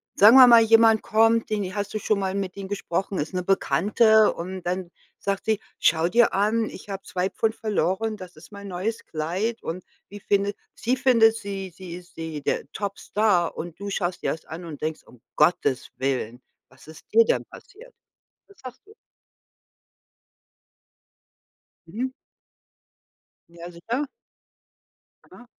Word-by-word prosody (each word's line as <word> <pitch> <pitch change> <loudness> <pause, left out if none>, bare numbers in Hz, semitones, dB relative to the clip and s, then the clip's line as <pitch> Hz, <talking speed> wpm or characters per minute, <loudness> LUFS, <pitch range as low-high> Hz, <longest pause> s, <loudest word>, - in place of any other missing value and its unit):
sagen 215 +5 +8
wir 255 -1 +10
mal, 235 -1 +8
jemand 225 -1 +5
kommt, 225 +1 +3
den 210 -2 0
i 185 +1 -6
hast 205 0 -4
du 215 - -2
schon 210 -1 0
mal 190 -1 -2
mit 195 -2 -3
ihm 195 -1 -6
gesprochen, 195 -1 -3
ist 150 +6 -4
'ne 180 -1 -2
Bekannte 210 +3 +3
und 185 +2 -7
dann 180 0 -3 0.3
sagt 195 -1 -3
sie: 220 -1 +1 0.2
„Schau 165 +1 +3
dir 235 +2 +3
an, 215 +3 +1
ich - - -12
habe 195 0 -5
2 185 +1 -2
Pfund 220 -1 -1
verloren, 215 +1 -1
das 180 -4 -11
ist 155 - -16
mein 200 0 -9
neues 195 +5 -4
Kleid.“ 180 +9 -3
Und 175 +2 -5 0.3
wie 205 0 -10
findet 200 +1 0 0.2
sie 255 +3 -1
findet 230 -4 +4
sie 195 -3 -6
sie 180 -2 -8
ist 180 0 -16
sie, 160 -3 -6
der 140 - -2
Topstar 200 -2 0
und 170 +2 -7
du 200 0 -5
schaust 180 -2 -3
dir - - +1
das 160 - -7
an 170 +2 -8
und 155 -3 -9
denkst: 155 0 -3
„Um 120 -2 -19
Gottes 150 -4 +1
Willen, 130 -2 -2 0.3
was 130 +3 -20
ist 155 - -13
dir 230 +1 +7
denn - - 0
passiert?“ 485 +5 -15 0.5
Was 400 -6 -21
sagst 255 -2 -11
du? 430 - -17 2.9
Mhm. 245 +9 -4 1.4
Ja, 170 +1 -10
sicher. 235 +12 -3 1.2
Aha. 245 - -15
200 Hz, 160 wpm, -24 LUFS, 175-220 Hz, 2.9 s, wir